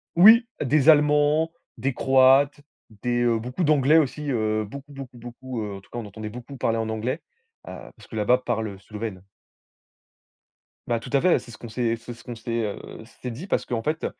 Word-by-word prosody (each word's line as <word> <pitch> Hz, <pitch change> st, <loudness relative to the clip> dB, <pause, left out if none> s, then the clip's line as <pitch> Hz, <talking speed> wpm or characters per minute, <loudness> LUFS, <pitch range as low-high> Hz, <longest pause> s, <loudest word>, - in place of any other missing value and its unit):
Oui 220 Hz, +7 st, +8 dB, 0.2 s
des 150 Hz, +2 st, +3 dB
allemands, 150 Hz, +1 st, +4 dB, 0.3 s
des 135 Hz, +3 st, -1 dB
croates, 135 Hz, +2 st, +4 dB, 0.4 s
des, 120 Hz, 0 st, 0 dB
heu, 115 Hz, -2 st, +2 dB
beaucoup 125 Hz, +9 st, -3 dB
d'anglais 150 Hz, 0 st, +4 dB
aussi, 150 Hz, -1 st, 0 dB
heu, 110 Hz, -2 st, 0 dB
beaucoup, 140 Hz, +7 st, -10 dB
beaucoup, 135 Hz, -3 st, -9 dB
beaucoup, 120 Hz, 0 st, -7 dB
heu, 100 Hz, -1 st, -5 dB
en 95 Hz, -, -12 dB
tout -, -, -24 dB
cas, -, -, -8 dB
on 120 Hz, -, -4 dB
entendait 105 Hz, +1 st, -7 dB
beaucoup 125 Hz, +5 st, -9 dB
parler 115 Hz, -1 st, 0 dB
en 110 Hz, -1 st, -2 dB
anglais, 115 Hz, +8 st, -2 dB, 0.5 s
heu, -, -, -6 dB, 0.2 s
parce -, -, -17 dB
que -, -, -10 dB
là-bas 110 Hz, +4 st, +3 dB
parle, 120 Hz, -3 st, -2 dB
heu, 100 Hz, -, -9 dB
Slovène. 105 Hz, -2 st, -7 dB, 1.6 s
Bah, 120 Hz, -1 st, 0 dB
tout -, -, -10 dB
à 140 Hz, -, +4 dB
fait, 180 Hz, -1 st, +4 dB
c'est 120 Hz, -, -13 dB
ce 110 Hz, -, -11 dB
qu'on 120 Hz, -, -9 dB
s'est 115 Hz, 0 st, 0 dB
c'est 115 Hz, +1 st, -9 dB
ce 115 Hz, -, -16 dB
qu'on 120 Hz, -, -6 dB
s'est, 115 Hz, 0 st, -2 dB
heu, 105 Hz, -, -4 dB, 0.4 s
s'est 125 Hz, -, -4 dB
dit, 150 Hz, +12 st, -8 dB
parce -, -, 0 dB
qu'en 115 Hz, -2 st, -2 dB
fait, 155 Hz, +4 st, -2 dB
125 Hz, 205 wpm, -24 LUFS, 115-145 Hz, 1.6 s, Oui